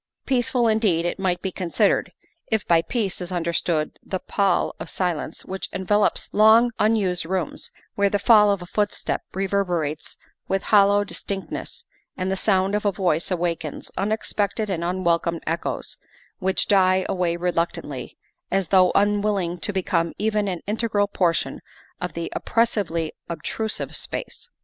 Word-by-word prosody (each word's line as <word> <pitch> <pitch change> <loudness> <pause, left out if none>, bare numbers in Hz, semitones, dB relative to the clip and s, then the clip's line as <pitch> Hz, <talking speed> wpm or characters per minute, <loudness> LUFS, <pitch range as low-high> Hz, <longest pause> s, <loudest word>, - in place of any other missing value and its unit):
Peaceful 245 -2 +2
indeed 210 -7 +2
it 175 - -2
might 185 -2 0
be 190 - -1
considered, 180 -3 +1 0.4
if 220 -2 -1
by 170 -1 +5
peace 200 -1 -2
is 180 +1 -5
understood 170 -2 -1
the 190 - -3
pall 195 0 +1
of 160 +1 -6
silence 175 -5 -3
which 190 0 -5
envelops 205 +2 +1
long 220 +3 +6
unused 205 -5 +2
rooms, 175 -2 -3 0.2
where 200 0 +2
the 205 - +1
fall 210 -1 +6
of 200 -3 0
a - - -8
footstep 205 +3 -1
rever 195 +1 +1
berates 160 -4 -3 0.3
with 195 -1 0
hollow 205 -1 +5
distinctness 200 -1 -5 0.3
and 185 +1 -1
the - - +1
sound 190 0 +1
of 210 - 0
a 205 - +2
voice 175 -4 +1
awakens 170 -4 -2
unexpected 210 0 0
and 170 -2 -2
unwelcome 170 -2 0
echoes, 165 +1 -3 0.4
which 190 -1 0
die 185 -1 +4
away 180 -2 0
reluctantly, 170 -1 -2 0.3
as 195 -3 0
though 185 -2 +5
unwilling 200 -3 +1
to - - -2
become 175 -3 0
even 210 -1 0
an 180 -3 -3
integral 210 -1 +1
portion 180 -4 0 0.4
of 180 -1 -3
the 170 0 -4
oppressively 200 -9 0 0.2
obtrusive 210 +6 -3
space. - - -5
190 Hz, 145 wpm, -23 LUFS, 175-205 Hz, 0.4 s, long